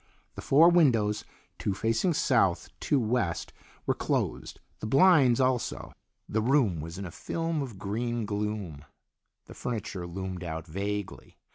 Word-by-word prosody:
The - - -8
four 155 +5 +6
windows, 115 -12 +3 0.3
two 100 - -1
facing 115 - +1
south, 115 -12 +2
two 145 - +1
west, 110 -7 -1 0.3
were - - +2
closed, - - -2 0.2
the 110 - -4
blinds 135 -2 +5
also. 130 -2 0 0.3
The 110 - 0
room 115 - +2
was 85 +3 -7
in 100 - -5
a 85 - -7
film 165 - -2
of 125 -7 -6
green 115 +4 -2
gloom. 105 -8 -3 0.6
The - - -12
furniture 105 -6 -4
loomed 95 +1 -5
out 80 -1 -5
vaguely. 100 +4 -5
110 Hz, 140 wpm, -28 LUFS, 95-130 Hz, 0.6 s, four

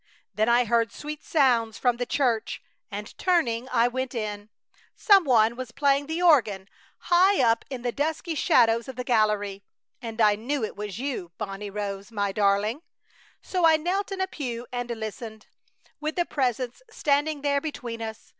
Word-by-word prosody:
Then 215 +3 +1
I 240 +1 +4
heard 230 -1 +1
sweet 300 +4 -7
sounds 240 -7 +2
from 245 -2 +1
the 245 0 -3
church, 240 -6 0 0.3
and, 210 +1 -7
turning, 260 -10 +1
I 235 -1 +3
went 260 +1 -3
in. 210 -2 -4 0.5
Some 395 -5 +5
one 230 -3 +4
was 255 -1 -6
playing 280 +1 +1
the 325 +3 -2
organ, 220 - +4 0.3
high 370 +3 +3
up 230 -2 +3
in 255 -3 -6
the 245 - 0
dusky 320 +5 -2
shadows 230 -5 +3
of 265 - -7
the 250 - -4
gallery, 210 -4 +1 0.4
and 230 -1 -7
I 210 -2 +5
knew 240 +5 -2
it 215 - -4
was 205 -2 -6
you, 240 -10 -4
Bonnie 205 -1 -5
Rose, 200 +1 -5
my 205 -2 -1
darling! 205 +6 +1 0.6
So 365 -2 -2
I 320 -1 +6
knelt 375 +6 -2
in 385 -1 -3
a - - +2
pew 245 -9 -5
and 245 -1 -4
listened, 220 -1 -6 0.5
with 305 +1 -3
the 350 - +1
Presence 255 - -2
standing 295 -5 0
there 280 -1 +1
between 240 -7 -6
us. 220 0 -7
240 Hz, 175 wpm, -26 LUFS, 215-290 Hz, 0.6 s, I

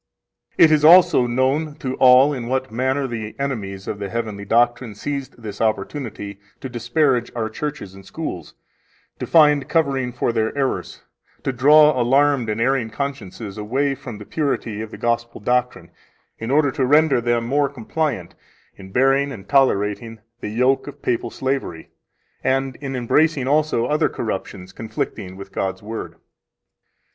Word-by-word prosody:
It, 160 - +7
is 150 -1 +3
also 165 -6 +7
known 135 +5 0
to 130 -4 -4
all 130 +3 +6
in 120 -4 -5
what 130 0 -2
manner 130 +4 0
the 115 -2 -6
enemies 100 -9 -4
of 105 - -4
the 100 -1 -4
heavenly 110 -3 -4
doctrine 120 0 +1
seized 140 +3 -5
this 105 -3 -7
opportunity 110 -2 -3 0.2
to 130 - -5
disparage 120 +1 0
our 110 -2 -2
churches 145 -7 -5
and 95 0 -13
schools, 95 - -6 0.6
to - - -4
find 150 -4 +4
covering 135 -6 +1
for 120 -1 -1
their 110 +4 -1
errors, 135 -2 -2 0.4
to 135 - -1
draw 150 +1 +5
alarmed 135 -1 +2
and 110 +1 -2
erring 125 -1 +1
consciences 110 -5 -6
away 135 +7 0
from 130 -5 -8
the 105 - -10
purity 120 -8 -2
of 110 - -6
the - - -10
Gospel 120 0 -2
doctrine, 125 +3 -1 0.5
in 115 - -5
order 145 0 +3
to 130 - -1
render 150 -2 +4
them 120 0 0
more 140 +3 +1
compliant 135 - -3 0.4
in 95 0 -12
bearing 135 +4 +2
and 100 -6 -10
tolerating 115 -4 +1 0.2
the 105 - -5
yoke 125 +6 +1
of 145 - -7
the 145 - -33
papal 115 - -1
slavery, 130 -11 -4 0.5
and 135 0 0
in 135 -2 -5
embracing 135 +3 +1
also 145 -4 +2
other 150 +4 +1
corruptions 95 -3 -5
conflicting 95 -4 -5
with 100 - -10
God's 95 +1 -3
Word. 110 +1 -6
125 Hz, 155 wpm, -21 LUFS, 110-140 Hz, 0.6 s, It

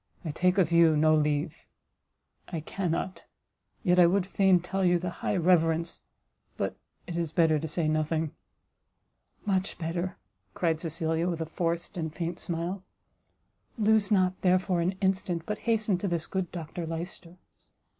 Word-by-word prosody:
I 155 - -2
take 180 +4 +2
of 175 -4 +3
you 165 -2 +5
no 155 +1 +4
leave 150 +1 0 0.8
I 170 - -4
cannot! 180 +2 -3 0.6
yet 180 -3 +4
I 175 - +8
would 185 +1 +2
fain 190 -1 +4
tell 190 +2 -2
you 175 -1 +4
the 175 0 -3
high - - 0
reverence 165 -1 +2 0.6
but - - -2 0.3
it 170 - -6
is 170 -2 -1
better 160 -2 +3
to 160 - -4
say 155 +1 -1
nothing 155 0 0 0.6
" - - -40
"Much 195 -2 0
better," 170 +2 -3 0.4
cried 165 -3 +1
Cecilia, 165 +1 -1
with 170 -2 -3
a - - -1
forced 170 +3 -2
and 160 -2 -2
faint 170 +1 -4
smile; 175 +3 -3 1.0
"lose 215 -2 +3
not, 185 -2 +2
therefore, 185 -1 +2
an 180 +3 0
instant, 185 -3 0
but 210 0 -3
hasten 215 -5 +2
to 200 - -2
this 170 -2 -1
good 190 -3 -3
Dr 170 0 -5
Lyster." 170 +1 -6
175 Hz, 155 wpm, -28 LUFS, 165-185 Hz, 1.0 s, I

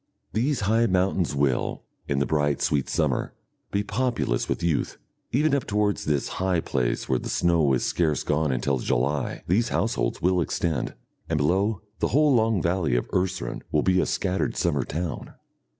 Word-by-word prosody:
These 125 +5 0
high 110 +3 +3
mountains 90 -4 +1
will, 70 -3 0 0.2
in 70 - 0
the 70 - +2
bright 75 -3 +1
sweet 70 -3 0
summer, - - 0 0.3
be 100 +1 0
populous 120 - -1
with - - -2
youth. 85 -4 0 0.3
Even 145 +3 +2
up 140 -3 +1
towards 105 0 0
this 75 -3 0
high 95 -2 +2
place 65 -6 -1
where 65 - +1
the - - -6
snow 85 -5 +2
is 65 - +1
scarce 80 -5 0
gone 75 -1 +1
until 65 +1 0
July, 65 +5 -1
these 110 +7 +2
households - - 0
will 90 0 +2
extend, 80 -1 -1 0.3
and 80 - +1
below, 95 +7 +1 0.2
the - - +2
whole 150 +1 +4
long 110 -6 +2
valley 85 -6 +1
of - - 0
Urseren 90 -10 -1
will 75 - +2
be 95 -1 +3
a - - -1
scattered 95 -1 -1
summer 75 -6 +1
town. 85 0 -5
85 Hz, 170 wpm, -25 LUFS, 70-100 Hz, 0.3 s, whole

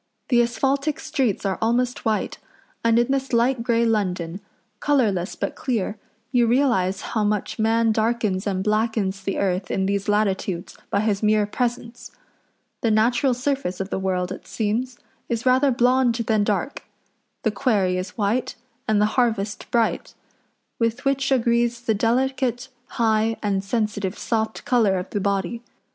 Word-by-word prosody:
The 240 -3 +5
asphaltic 275 +5 0
streets 260 -10 -1
are 195 -1 -1
almost 245 +2 0
white, 220 -1 -1 0.4
and 230 0 +4
in 240 +2 +2
this 270 -1 -1
light 240 +1 +2
grey 235 0 +2
London, 185 -5 -1 0.4
colourless 215 -11 +1
but - - -3
clear, 220 -4 -2 0.3
you 240 -2 +3
realise 225 -7 +2
how 220 -2 -2
much 210 +2 -1
man 225 +1 +3
darkens 220 -3 0
and 190 -1 -1
blackens 215 -2 0
the 195 0 -3
earth 190 0 -1
in 190 - 0
these 200 +1 -1
latitudes 195 -4 0
by 200 - +1
his 210 -2 0
mere 215 -1 +3
presence. 240 +2 -3 0.7
The 230 - +2
natural 240 +4 +3
surface 250 -7 -2
of 195 +1 -4
the - - -1
world, 185 -1 -1
it 190 - -8
seems, 235 +3 -2 0.3
is 230 0 -2
rather 260 +2 +4
blond 250 -1 +3
than 220 -3 +1
dark; 205 +7 -2 0.6
the 220 - +2
quarry 205 -7 +1
is 185 0 -5
white, 220 +4 0 0.3
and 215 -1 +3
the 210 - +4 0.2
harvest 215 -4 -1
bright; 230 -2 0 0.6
with 230 +2 -1
which 275 0 +1
agrees 235 -1 +2
the 235 -2 0
delicate, 250 +3 0 0.3
high, 225 -1 +2
and 195 -2 0
sensitive 205 -2 -2
soft 220 -1 -2
colour 220 -6 +3
of 180 +1 -5
the 205 - -1
body. 200 +3 -1
225 Hz, 155 wpm, -23 LUFS, 200-240 Hz, 0.7 s, The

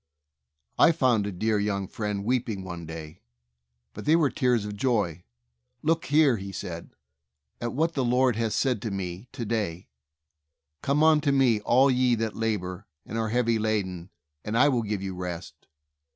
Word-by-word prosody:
I 165 - +7
found 125 -9 +2
a - - -3
dear 105 +3 0
young 100 -2 -1
friend 105 -1 -3
weeping 115 -5 -1
one 85 -3 -7
day, 80 +1 -8 0.7
but - - -8
they 155 +2 +5
were 155 -5 +3
tears 125 -4 +1
of 105 0 -5
joy. 105 - 0 0.6
"Look 165 +1 +1
here/* 145 -4 +4
he 100 0 -7
said, 85 -3 -7 0.7
"at 120 0 -2
what 165 +5 +1
the 135 - 0
Lord 125 0 +3
has 115 -1 -1
said 125 -6 +1
to 110 - -3
me 95 +2 -5
to 125 -3 -5
day: 100 - -3 0.9
'Come 145 +3 +2
unto 155 -2 +4
Me, 130 -5 +3
all 130 +5 +4
ye 125 -1 +3
that 115 -1 -2
labor, 100 -4 -3 0.2
and - - -7
are 110 -1 -1
heavy 115 -1 +1
laden, 95 -5 -2 0.3
and 110 +2 -2
I 145 +4 +6
will 125 -4 +1
give 105 -3 -3
you 95 -1 -4
rest. 85 -4 -7
110 Hz, 170 wpm, -27 LUFS, 95-130 Hz, 0.9 s, I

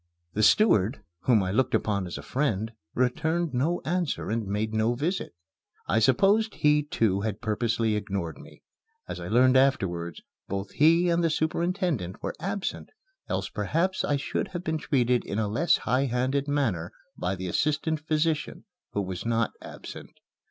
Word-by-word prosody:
The 110 - 0
steward, 110 - +4 0.2
whom 115 -6 +4
I 90 - -1
looked 130 +5 +2
upon 100 -4 0
as 85 - -5
a - - -8
friend, 110 -6 -1 0.2
returned 160 +6 0
no 150 +8 0
answer 170 - -1
and 110 -2 -1
made 105 +2 -2
no 110 +2 +2
visit. 155 - -2 0.5
I 110 - +3
supposed 195 - +3
he, 150 0 +4
too, 110 -9 0
had 105 -1 -2
purposely 110 0 0
ignored 100 -5 -3
me. - - -15 0.4
As - - -5
I - - -6
learned 130 +3 +5
afterwards, 90 - +1 0.2
both 100 +1 -4
he 165 +4 +4
and 170 0 +2
the 165 - +3
superintendent 160 - -1
were - - -2
absent, 195 +3 -3 0.4
else - - -1
perhaps 185 +4 0
I 145 - +1
should 140 - -2
have 175 -2 -6
been 160 -1 -1
treated 125 -5 +1
in 100 - -4
a 110 -1 +1
less 130 +12 +3
high 130 +4 +1
handed 130 +3 0
manner 115 - 0 0.2
by 90 +2 -2
the 95 0 -6
assistant 150 - 0
physician, 155 0 -1 0.3
who 100 - 0
was 95 -2 -5
not 115 -1 +1
absent. - - -9
125 Hz, 165 wpm, -27 LUFS, 105-160 Hz, 0.5 s, learned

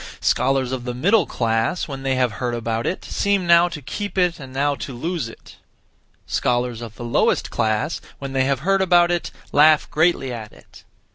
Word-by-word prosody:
Scholars 130 -1 +1
of 130 -2 -3
the 125 -1 -4
middle 200 - +3
class, 115 +7 -1
when 135 -3 -6
they 135 0 0
have 125 -2 +1
heard 120 +4 -3
about 115 0 -2
it, 185 - -3
seem 200 -2 0
now 170 0 +6
to 150 -4 -8
keep 200 +9 -5
it 180 -2 +2
and 135 -2 -9
now 140 +2 +1
to 135 -2 -7
lose 160 -1 -3
it. - - -15 0.7
Scholars 120 -1 -1
of 115 -2 -8
the 120 - -7
lowest 120 - +1
class, 110 +8 -1 0.2
when 135 -1 -6
they 130 0 +2
have 135 -1 0
heard 195 +4 +2
about 175 -2 +4
it, 175 -1 -1 0.2
laugh 150 +1 +5
greatly 155 -5 +1
at 110 -3 -7
it. - - -17
135 Hz, 195 wpm, -21 LUFS, 120-170 Hz, 0.7 s, now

